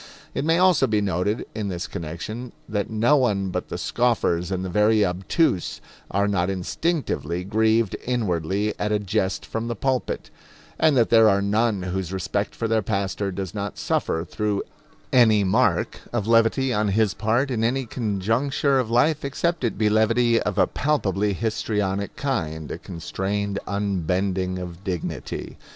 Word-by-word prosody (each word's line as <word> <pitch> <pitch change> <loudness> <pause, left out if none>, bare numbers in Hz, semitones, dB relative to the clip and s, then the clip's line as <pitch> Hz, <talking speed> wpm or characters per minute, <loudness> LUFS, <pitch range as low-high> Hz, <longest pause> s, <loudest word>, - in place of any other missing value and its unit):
It - - -2
may 165 +2 +3
also 185 -2 +4
be 110 -1 +2
noted 100 +2 -1
in 105 -2 -3
this 90 -2 -3
connection 85 +10 -6
that 105 -2 -2
no 115 +6 +3
one 100 -7 +1
but - - -3
the - - -4
scoffers 110 -8 +1
and 95 -1 -2
the - - -2
very 105 +3 +3
obtuse 95 - 0 0.3
are 100 +1 +1
not 95 -3 +1
instinctively 95 - -2
grieved 110 +2 +2
inwardly 100 -3 0
at 105 - -1
a 105 - +3
jest 100 -1 -1
from 115 +1 -4
the 120 - -2
pulpit; 130 +3 -2 0.5
and 155 -4 +4
that 115 - +3
there 115 -1 +7
are 100 -1 +3
none 105 0 +1
whose 90 -1 -3
respect 95 -3 -2
for 115 - -2
their 110 0 +2
pastor 100 -1 -2
does 95 -1 -5
not 100 -1 -4
suffer 80 +1 -1
through 105 +2 -1 0.5
any 110 -5 +5
mark 100 -2 +1
of 120 -4 -1
levity 115 +3 +3
on 105 -1 +1
his 105 0 +2
part 115 +7 0
in 115 -3 0
any 130 +3 +1
conjuncture 120 +6 0
of 120 -4 -1
life, 145 +6 +2
except 165 +4 -1
it 120 - -1
be 105 0 +2
levity 115 +2 +3
of 105 -3 -2
a - - +5
palpably 105 -9 0
histrionic 105 -2 -2
kind 80 - -3
a - - -5
constrained 100 +3 -3
unbending 95 -1 -1
of 90 0 -7
dignity. 90 -5 -5
105 Hz, 160 wpm, -24 LUFS, 95-115 Hz, 0.5 s, there